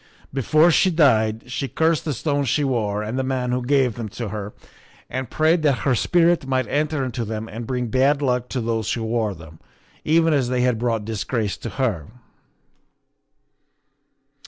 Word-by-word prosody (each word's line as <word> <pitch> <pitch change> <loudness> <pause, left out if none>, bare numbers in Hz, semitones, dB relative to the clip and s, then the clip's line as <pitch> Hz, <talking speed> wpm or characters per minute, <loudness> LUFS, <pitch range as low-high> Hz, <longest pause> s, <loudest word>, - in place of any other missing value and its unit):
Before 155 +6 +4
she 185 - +4
died 115 -10 +3
she 135 - -2
cursed 160 +3 +1
the 150 - -1
stones 145 0 -1
she 150 - +1
wore 105 -6 -1
and 115 +5 -3
the - - 0
man 130 -1 -1
who 125 0 0
gave 130 -2 +2
them 115 -2 -6
to 115 -3 -3
her, 105 -1 -5 0.6
and 130 -2 -4
prayed 160 +2 +2
that 145 -4 +1
her 135 - +3
spirit 170 +3 +2
might 130 -3 0
enter 150 -1 0
into 125 -1 -3
them 110 0 -5
and 115 +1 -7
bring 125 -1 -1
bad 135 +5 +2
luck 125 -3 -1
to 130 - -2
those 115 -2 -1
who 115 - -3
wore 110 -3 -1
them, 80 -1 -13 0.4
even 165 +1 +3
as 135 -4 +1
they 125 -1 0
had 125 -3 +1
brought 115 -3 -1
disgrace 110 -1 -2
to 115 - -6
her." 105 - -1
125 Hz, 180 wpm, -22 LUFS, 110-140 Hz, 0.6 s, Before